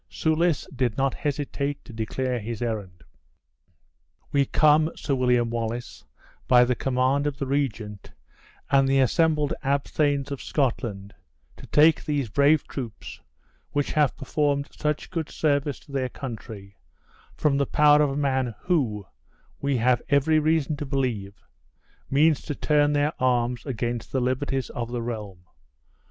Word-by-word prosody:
Soulis 160 0 +1
did 125 -4 0
not 135 -1 +1
hesitate 145 -1 -3
to - - -11
declare 125 +3 -2
his 115 0 -5
errand. 100 -7 -4 1.3
"We 140 -1 +3
come, 155 +2 +4
Sir 140 - -2
William 125 -3 +2
Wallace, 115 +1 -4 0.4
by 125 -1 +6
the 125 - +1
command 130 +3 +1
of 145 -1 -3
the 140 - -3
regent, 115 -7 -3 0.6
and 135 -1 +4
the 135 0 +3
assembled 150 +2 +2
abthanes 140 0 0
of 140 - -4
Scotland, 115 -8 -2 0.4
to - - -13
take 155 +1 +4
these 145 -6 -1
brave 140 +4 +3
troops, 120 -6 -7 0.5
which 145 -1 0
have 150 -3 +2
performed 140 0 -1
such 150 +3 -3
good 165 -4 -3
service 145 -2 0
to - - -17
their 130 -2 -1
country, 110 -6 -8 0.6
from 145 -2 +2
the 140 - +1
power 150 0 +5
of 150 - +3
a 135 - -3
man 130 -5 0
who, 125 - 0 0.5
we 140 -2 0
have 120 +1 +2
every 150 +3 +3
reason 155 -1 +1
to 150 - -4
believe, 120 -8 -3 0.7
means 150 +2 +3
to 145 - -5
turn 145 0 +2
their 145 +2 +1
arms 125 0 +1
against 120 -2 -3
the 130 - 0
liberties 130 +1 -1
of 120 -1 -5
the 120 -1 -3
realm. 105 -6 -6
135 Hz, 145 wpm, -25 LUFS, 120-145 Hz, 1.3 s, by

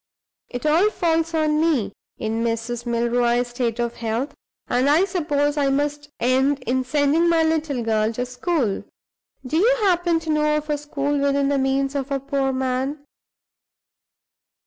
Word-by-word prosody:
It 245 +3 -6
all 330 +7 +4
falls 330 -4 0
on 305 -1 +2
me, 265 -12 +1 0.2
in 225 +1 -2
Mrs. 235 +1 -3
Milroy's 240 +1 +1
state 240 -1 -2
of 235 0 -2
health, 230 +5 -2 0.3
and 255 +3 +2
I 320 +6 +4
suppose 300 -6 0
I 280 -1 +2
must 290 +1 -1
end 265 +3 +2
in 255 +2 0
sending 295 +5 +2
my 330 -1 +3
little 315 -6 0
girl 220 -1 +1
to 245 +2 -2
school. 250 - -1 0.6
Do 300 +5 -1
you 480 +8 +4
happen 350 -3 +2
to 320 -1 -3
know 300 0 +2
of 300 0 -4
a 295 - 0
school 290 -1 -2
within 280 0 +1
the 280 -1 +1
means 270 +1 0
of 280 -1 -3
a 275 -1 -1
poor 275 0 -1
man? 265 +3 -2
280 Hz, 160 wpm, -22 LUFS, 245-305 Hz, 0.6 s, all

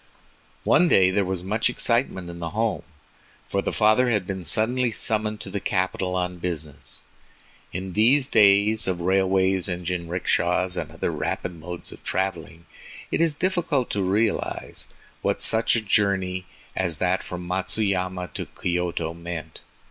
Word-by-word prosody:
One 180 - +5
day 95 - +5
there 100 +1 +2
was 95 -1 -3
much 105 +5 +1
excitement 115 -7 0
in 85 0 -8
the 85 -1 -3
home, 115 -1 +1 0.7
for 100 - 0
the - - -2
father 110 +4 +4
had 105 -5 +1
been 95 -1 -4
suddenly 115 +9 +2
summoned 110 -1 +1
to 95 - -6
the 100 - -2
capital 95 -1 -1
on 90 -1 -2
business. 80 -5 -5 0.7
In 95 +1 -5
these 125 +7 +4
days 105 -2 +4
of 90 -2 -1
railways 95 0 +2
and 90 0 -4
jinrickshas 90 +1 0
and - - -3
other - - -2
rapid 90 - -3
modes 85 +1 -7
of - - -13
traveling, 85 -3 -3 0.5
it - - +1
is 165 -3 +2
difficult 165 -7 0
to 100 - 0
realize 100 +4 -1 0.3
what - - 0
such 110 +1 +3
a 115 - +1
journey 95 -3 +1 0.3
as 85 -5 0
that 95 +3 +1
from 90 0 -6
Matsuyama 95 -1 -1
to - - -4
Kyoto 85 -2 -2
meant. 85 -2 -7
95 Hz, 150 wpm, -24 LUFS, 90-110 Hz, 0.7 s, One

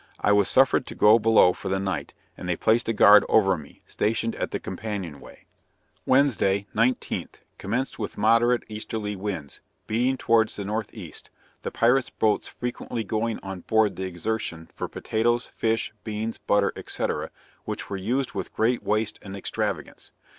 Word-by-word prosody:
I - - +2
was 100 -1 +4
suffered 130 -1 +4
to - - -7
go 110 +2 +6
below 110 -5 +5
for - - -6
the 95 - +1
night, 95 -1 -3 0.2
and 90 - -7
they 90 - +1
placed 115 +6 +2
a - - +4
guard 105 -1 +7
over 95 -3 +4
me, 75 -4 -12
stationed 115 +1 -1
at - - -2
the - - -3
companion 100 -9 -5
way. - - -15 0.6
Wednesday, 115 -8 +3
19th, 125 +3 -1 0.2
commenced 120 +7 -2
with 105 - -4
moderate 115 +3 +3
easterly 105 -1 -4
winds, 95 -7 -5 0.2
beating 125 +4 +1
towards 115 -2 +2
the 100 - -5
northeast, 105 -5 -5 0.3
the - - -3
pirate's 125 +2 +2
boats 110 -1 +1
frequently 120 -1 -4
going 110 +2 -2
on 95 -1 -6
board 110 +2 +2
the 95 0 -3
Exertion 85 -2 -4
for - - -4
potatoes, 120 +2 0
fish, 115 0 -1
beans, 110 +1 -4
butter, 100 -1 +2
&c. - - -2 0.6
which - - -4
were 100 - -2
used 120 +8 -1
with 95 -2 -5
great 115 +2 +2
waste 105 0 -1
and 95 -1 -8
extravagance. 95 - -4
110 Hz, 160 wpm, -25 LUFS, 100-115 Hz, 0.6 s, guard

